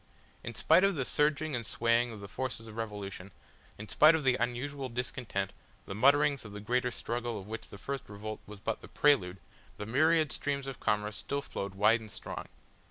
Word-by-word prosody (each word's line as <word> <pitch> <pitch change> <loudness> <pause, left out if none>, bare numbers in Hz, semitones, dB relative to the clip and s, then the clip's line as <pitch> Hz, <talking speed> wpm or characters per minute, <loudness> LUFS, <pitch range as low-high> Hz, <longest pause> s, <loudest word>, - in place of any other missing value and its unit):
In 115 - -6
spite 180 - +5
of 195 -1 +4
the 135 -4 -1
surging 150 +1 +1
and 120 - -2
swaying 115 +2 +2
of 110 -3 -8
the 100 - -7
forces 115 +2 -4
of 110 - -10
revolution, 100 -4 -5 0.5
in 105 - -8
spite 155 +7 +6
of 160 - -1
the 130 -2 +4
unusual 130 +3 -2
discontent, 115 -5 -3 0.3
the - - -5
mutterings 140 +5 +4
of 105 -2 -9
the 105 - -6
greater 125 +4 +1
struggle 120 -2 -3
of 95 - -9
which 110 +2 -7
the - - -10
first 135 +6 -5
revolt 105 +1 -6
was 105 -1 -10
but 110 +2 -3
the - - -10
prelude, 100 -11 +3 0.4
the 105 - -5
myriad 155 +6 +3
streams 140 -1 -1
of 135 -2 -6
commerce 105 0 0
still 140 0 -3
flowed 100 -6 -5
wide 105 +4 +5
and 110 -1 -11
strong. - - -7
120 Hz, 200 wpm, -31 LUFS, 105-140 Hz, 0.5 s, spite